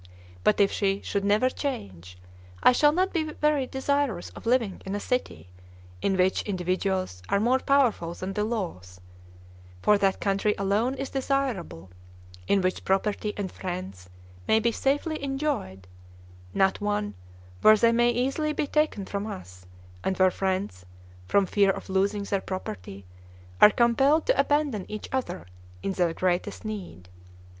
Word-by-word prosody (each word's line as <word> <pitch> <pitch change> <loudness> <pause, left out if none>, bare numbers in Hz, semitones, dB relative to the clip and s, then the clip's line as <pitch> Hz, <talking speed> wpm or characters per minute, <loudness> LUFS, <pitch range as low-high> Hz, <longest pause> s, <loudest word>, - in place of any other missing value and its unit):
But 210 - +3
if 200 -1 +4
she 195 -1 0
should 200 -1 -2
never 210 +5 +3
change, 95 - -5 0.5
I - - +8
shall 295 +4 +4
not 370 +4 0
be 310 -3 -1
very 300 -4 +1
desirous 265 -7 -1
of - - -10
living 230 -5 +1
in 195 +1 -4
a - - -2
city 90 - -3 0.5
in 195 -1 +1
which 185 +1 +2
individuals 185 - -2
are 200 - +2
more 245 +5 +3
powerful 245 -12 +2
than 190 +1 -5
the 210 - -1
laws; 165 - -4 0.8
for 210 -1 +4
that 195 -1 +1
country 200 +1 +1
alone 205 +7 +1
is 270 0 -5
desirable 260 - -2 0.6
in 200 - +3
which 185 0 -1
property 205 +2 0
and 195 -3 -3
friends 175 - -6 0.4
may 220 - +4
be 235 +1 +1
safely 290 +5 -1
enjoyed, 270 - -3 0.6
not 190 - +1
one 205 0 -1 0.5
where 215 0 +7
they 230 +2 +4
may 240 +1 +3
easily 270 +6 0
be 300 - -1
taken 300 -9 0
from 200 +2 -4
us, 90 - -9 0.4
and 190 -1 -1
where 185 -1 +4
friends, 190 - -2 0.4
from 200 - +3
fear 200 +1 +3
of 195 - -3
losing 200 +2 +1
their 200 -1 -1
property, 100 - -6 0.6
are - - +11
compelled 270 +8 +3
to - - +2
abandon 290 -9 +1
each 215 0 -6
other 260 - -3 0.4
in - - -1
their 175 -3 +1
greatest 180 +4 -1
need. 190 - -7
205 Hz, 150 wpm, -26 LUFS, 185-255 Hz, 0.8 s, are